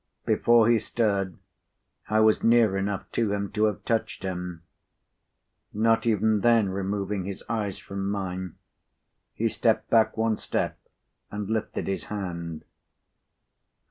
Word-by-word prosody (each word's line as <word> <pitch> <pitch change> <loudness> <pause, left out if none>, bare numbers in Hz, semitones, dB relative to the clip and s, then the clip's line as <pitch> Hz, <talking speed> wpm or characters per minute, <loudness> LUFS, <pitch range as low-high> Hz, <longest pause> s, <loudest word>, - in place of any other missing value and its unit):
p. - - +3
92Before 120 -1 +5
he 115 - +4
stirred, 100 -5 -1 0.7
I 110 0 +3
was 110 0 +4
near 115 -4 +4
enough 95 0 -2
to 110 -3 0
him 100 -1 -2
to 105 +1 +2
have 105 - -2
touched 115 -1 -1
him. 90 -2 -5 1.1
Not 115 +2 +2
even 110 -1 +3
then 115 -2 +4
removing 100 0 -2
his 100 0 -6
eyes 105 -4 -2
from 100 0 -4
mine, 95 -3 -4 0.8
he - - +1
stepped - - 0
back 115 -1 +4
one 110 -1 +1
step, - - -2 0.5
and 105 -1 -5
lifted 110 -1 -2
his 95 - -2
hand. 85 -5 -5
105 Hz, 135 wpm, -26 LUFS, 95-110 Hz, 1.1 s, 92Before